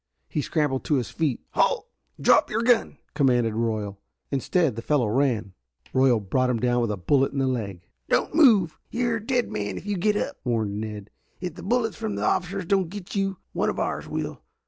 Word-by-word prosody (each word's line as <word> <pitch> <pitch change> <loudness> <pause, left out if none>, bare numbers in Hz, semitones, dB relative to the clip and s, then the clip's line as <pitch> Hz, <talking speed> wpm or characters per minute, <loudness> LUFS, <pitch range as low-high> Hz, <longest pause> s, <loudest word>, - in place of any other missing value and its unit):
He 150 - -2
scrambled 145 -3 0
to 150 - +2
his 125 -4 -1
feet. 155 -6 -1
"Halt. - - +1 0.3
Drop - - +5
your 225 +2 0
gun!" 235 - +3 0.2
commanded 125 -6 +2
Royal. 110 -3 -2 0.3
Instead 140 0 +1
the 115 - -4
fellow 140 0 +2
ran. 115 -4 +1 0.4
Royal 130 -3 +4
brought 125 +6 0
him 120 -2 0
down 120 +1 +2
with 115 - 0
a 105 - -2
bullet 135 +10 +2
in - - -4
the 135 - +2
leg. 100 -9 -3 0.2
"Don't - - +1
move. 220 - +5
You 240 0 0
are - - +1
a 215 - -8
dead 245 +1 0
man 105 -1 -3
if - - -8
you 205 -1 -1
get 210 +4 +2
up!" - - -3
warned 110 -4 -1
Ned. 105 -2 -6 0.3
"If 180 -1 -4
the - - -10
bullets 225 -4 0
from 105 -2 -3
the 100 - -3
officers 180 - 0
don't 190 -1 +1
get 200 0 -8
you, 195 -1 0 0.2
one - - +1
of - - -3
ours - - -2
will. - - -4
135 Hz, 210 wpm, -25 LUFS, -, 0.4 s, Drop